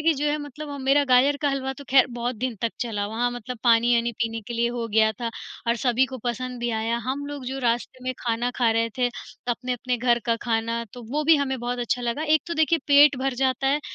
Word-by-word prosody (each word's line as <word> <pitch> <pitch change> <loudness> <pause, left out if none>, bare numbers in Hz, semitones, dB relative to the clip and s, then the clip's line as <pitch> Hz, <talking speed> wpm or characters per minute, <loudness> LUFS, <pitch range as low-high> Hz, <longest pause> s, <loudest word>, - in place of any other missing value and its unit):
कि 320 +1 +3
जो 290 +1 -1
है, 300 - 0
मतलब 290 +1 -8
ह 285 - -6
मेरा 285 +2 +4
गाजर 270 +2 +4
का 290 - +3
हलवा 265 -1 -2
तो, 285 +1 -11
ख़ैर 260 -1 +6
बहुत 240 0 -2
दिन 250 +1 -2
तक 230 - 0
चला। 210 -4 -2
वहाँ 235 +3 -1
मतलब 245 0 -7
पानी-वानी 235 0 +4
पीने 225 0 -2
के 240 - -5
लिए 235 +1 +1
हो 230 - -2
गया 220 0 +4
था 230 -1 -2 0.4
और 235 +1 +2
सभी 250 +2 +2
को 260 -1 -8
पसंद 250 +1 -3
भी 240 0 -1
आया। 225 +1 -1
हम 285 +2 -2
लोग 285 -2 -6
जो 265 +1 -3
रास्ते 245 +1 -1
में 255 - -1
खाना 235 +1 -1
खा 235 -3 +3
रहे 230 0 +1
थे 245 -1 +3 0.4
अपने-अपने 250 0 -1
घर 240 0 +2
का 230 - +3
खाना, 230 0 -1
तो 245 - -10
वो 300 +1 +1
भी 325 +1 +7
हमें 265 -2 -1
बहुत 245 +1 -3
अच्छा 245 +1 -1
लगा 240 +5 -2
एक 310 -1 +3
तो 340 - -3
देखिए 320 +1 +3
पेट 285 -1 +7
भर 265 -1 -1
जाता 260 +1 0
है, 285 +2 +2
250 Hz, 245 wpm, -24 LUFS, 235-275 Hz, 0.4 s, भी